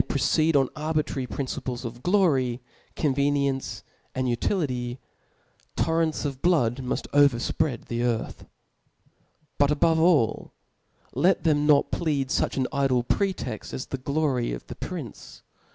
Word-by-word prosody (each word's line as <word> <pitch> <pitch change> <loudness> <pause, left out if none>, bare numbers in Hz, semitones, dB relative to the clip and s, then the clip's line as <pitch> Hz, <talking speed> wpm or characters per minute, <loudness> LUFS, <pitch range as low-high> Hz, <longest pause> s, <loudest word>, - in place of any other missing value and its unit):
proceed 155 +3 +2
on 135 -2 +4
arbitrary 155 -4 -2
principles 130 -2 -4
of 120 +1 -7
glory, 140 -10 +2 0.4
convc 140 -1 +1
niency, 140 -2 -2 0.3
and 130 0 0
utility; 125 - -1 0.8
torrents 160 -2 0
of 135 -2 -4
l^ood 130 -10 +2
muft 130 -1 -3
over 140 -4 +5
fpread 125 +1 -1
the 120 0 -3
earth. 120 -2 -2 1.1
But 145 - +4
above 160 +2 +3
all, 160 -9 +2 0.6
let 175 +8 +2
them 150 -2 +2
not 145 -2 +4
plead 145 -5 -1
fuch - - 0
an 130 - +1
idle 135 -3 +2
pretext 155 - -2
as 130 - -4
the 135 - -5
glory 140 - 0
of - - -7
the - - -8
prince. - - -8
140 Hz, 135 wpm, -26 LUFS, 125-155 Hz, 1.1 s, over